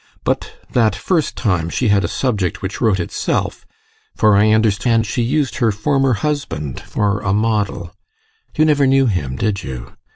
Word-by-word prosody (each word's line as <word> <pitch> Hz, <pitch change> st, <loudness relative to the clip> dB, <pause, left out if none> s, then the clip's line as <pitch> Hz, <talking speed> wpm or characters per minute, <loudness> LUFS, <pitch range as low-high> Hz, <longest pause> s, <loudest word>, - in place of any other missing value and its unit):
But -, -, -2 dB, 0.2 s
that 110 Hz, -5 st, +2 dB
first 165 Hz, -, -1 dB
time 90 Hz, -7 st, 0 dB
she 120 Hz, +5 st, 0 dB
had 100 Hz, -1 st, +3 dB
a -, -, 0 dB
subject 105 Hz, -10 st, -2 dB
which 95 Hz, -, -4 dB
wrote 110 Hz, -5 st, +2 dB
itself 85 Hz, -, -2 dB, 0.5 s
for 105 Hz, -1 st, +4 dB
I 105 Hz, +2 st, +4 dB
understand 110 Hz, +1 st, +2 dB
she 120 Hz, -, -2 dB
used 135 Hz, +3 st, 0 dB
her 120 Hz, -4 st, +2 dB
former 135 Hz, +5 st, +1 dB
husband 115 Hz, -, -3 dB
for 105 Hz, 0 st, -1 dB
a 100 Hz, -, -1 dB
model. 105 Hz, -5 st, -1 dB, 0.6 s
You 155 Hz, -, +4 dB
never 145 Hz, -3 st, +3 dB
knew 135 Hz, 0 st, +4 dB
him, 75 Hz, -, -1 dB
did 100 Hz, +7 st, -1 dB
you? 65 Hz, -6 st, -7 dB
110 Hz, 165 wpm, -18 LUFS, 100-130 Hz, 0.6 s, for